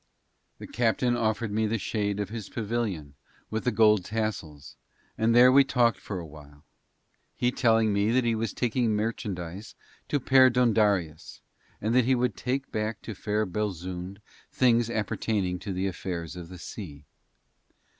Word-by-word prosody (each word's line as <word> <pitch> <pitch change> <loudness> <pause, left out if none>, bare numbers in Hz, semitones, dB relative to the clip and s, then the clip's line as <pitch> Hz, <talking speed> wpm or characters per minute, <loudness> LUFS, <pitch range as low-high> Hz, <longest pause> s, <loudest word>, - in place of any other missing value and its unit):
The - - -9
captain 120 +1 +1
offered 110 -1 -1
me 110 +1 +1
the 115 +2 0
shade 105 -1 -2
of 105 - -2
his 110 -2 -6
pavilion 110 - -3 0.4
with 110 +2 -3
the 125 - +2
gold 105 -3 +4
tassels, 90 -9 -4 0.4
and 115 +1 +2
there 125 +1 +8
we 140 +1 +7
talked 120 -6 +2
for 100 - -6
a 85 - -6
while, 75 -1 -14 0.7
he 125 0 +1
telling 115 -4 +3
me 100 +1 +1
that 125 +2 +2
he 115 -1 +1
was 110 +1 -2
taking 120 -2 0
merchandise 100 -3 -4 0.3
to 145 - +1
Perdóndaris, 115 - +3 0.4
and 110 +3 -1
that 125 -1 +4
he 130 +1 +3
would 125 -4 0
take 135 +2 -3
back 110 0 -3
to 110 - -6
fair 105 +2 -1
Belzoond 95 -1 -4 0.3
things 120 -2 +3
appertaining 105 -4 -1
to 100 - -6
the 95 +1 -2
affairs 90 -3 -4
of 85 -2 -8
the 90 - -9
sea. 80 -4 -9
110 Hz, 155 wpm, -27 LUFS, 95-120 Hz, 0.7 s, there